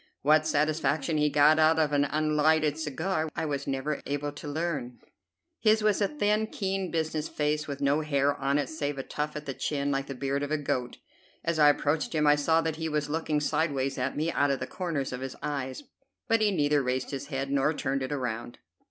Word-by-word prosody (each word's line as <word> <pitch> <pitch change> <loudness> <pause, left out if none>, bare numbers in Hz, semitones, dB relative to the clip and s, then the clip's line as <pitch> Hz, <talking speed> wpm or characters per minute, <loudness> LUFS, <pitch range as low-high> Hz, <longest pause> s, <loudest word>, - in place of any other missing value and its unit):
What 155 +2 +4
satisfaction 155 0 +1
he 150 0 +3
got 150 +2 +5
out 160 +1 +5
of 155 -2 +2
an 145 0 +3
unlighted 155 0 +2
cigar 160 +2 -2
I - - -1
was 140 -2 -3
never 135 +2 -2
able 145 +1 -2
to 145 +1 -9
learn. 145 -5 -3 0.6
His 215 0 +3
was 210 -1 +2
a 200 - +4
thin, 215 -5 +1
keen, 195 -3 -2
business 155 -1 -2
face, 150 +1 -1
with 140 -1 -5
no 140 +2 +2
hair 145 -2 +1
on 140 +1 0
it 145 - 0
save 145 -2 -3
a 135 - -3
tuft 150 +2 -4
at 150 0 -6
the 135 - -3
chin, 140 +1 -1
like 135 0 -1
the 135 - -5
beard 140 +2 -1
of 145 - -2
a 155 - +1
goat. 125 -4 -2 0.5
As 165 -1 -1
I 150 -1 +7
approached 150 +3 0
him 150 -1 +2
I 150 0 +6
saw 160 +3 +2
that 160 -1 -2
he 160 0 -2
was 150 -1 -1
looking 155 -1 0
sideways 145 -3 0
at 130 +2 -2
me 160 +3 0
out 145 - +2
of 135 -1 0
the - - -3
corners 160 -8 -3
of 125 - -5
his 135 0 -5
eyes, 140 - -3 0.4
but 225 -1 +3
he 215 - +4
neither 150 -6 +2
raised 130 0 -2
his 140 0 -5
head 135 -1 -3
nor 140 +2 +2
turned 135 -3 -2
it 130 - -3
around. 120 -4 -3
150 Hz, 220 wpm, -28 LUFS, 140-160 Hz, 0.6 s, I